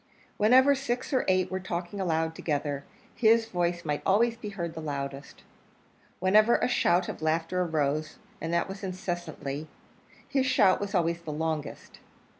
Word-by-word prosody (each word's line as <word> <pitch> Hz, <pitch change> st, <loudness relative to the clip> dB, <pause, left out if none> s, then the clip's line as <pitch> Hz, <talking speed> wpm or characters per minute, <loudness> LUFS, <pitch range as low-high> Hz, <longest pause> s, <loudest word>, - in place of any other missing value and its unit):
Whenever 260 Hz, +6 st, +6 dB
six 265 Hz, 0 st, -3 dB
or 260 Hz, -, +2 dB
eight 185 Hz, -1 st, +2 dB
were 185 Hz, -, -1 dB
talking 180 Hz, +1 st, -4 dB
aloud 160 Hz, -2 st, 0 dB
together, 145 Hz, -3 st, -2 dB, 0.3 s
his 225 Hz, 0 st, +4 dB
voice 175 Hz, -4 st, -1 dB
might 150 Hz, -1 st, -1 dB
always 230 Hz, +4 st, +3 dB
be 230 Hz, -3 st, -7 dB
heard 170 Hz, -5 st, -4 dB
the 160 Hz, -, -6 dB
loudest. 140 Hz, -2 st, -6 dB, 0.7 s
Whenever 215 Hz, +5 st, +4 dB
a -, -, +1 dB
shout 180 Hz, -7 st, +2 dB
of -, -, -6 dB
laughter 165 Hz, +3 st, 0 dB
arose 155 Hz, -2 st, -1 dB, 0.2 s
and 165 Hz, -, -3 dB
that 170 Hz, 0 st, +1 dB
was 195 Hz, +1 st, -8 dB
incessantly 175 Hz, -5 st, -4 dB, 0.6 s
his 270 Hz, -2 st, +1 dB
shout 195 Hz, -7 st, +4 dB
was 205 Hz, 0 st, -3 dB
always 170 Hz, -1 st, +1 dB
the 160 Hz, -2 st, -6 dB
longest. 155 Hz, -1 st, -4 dB
175 Hz, 155 wpm, -28 LUFS, 160-205 Hz, 0.7 s, Whenever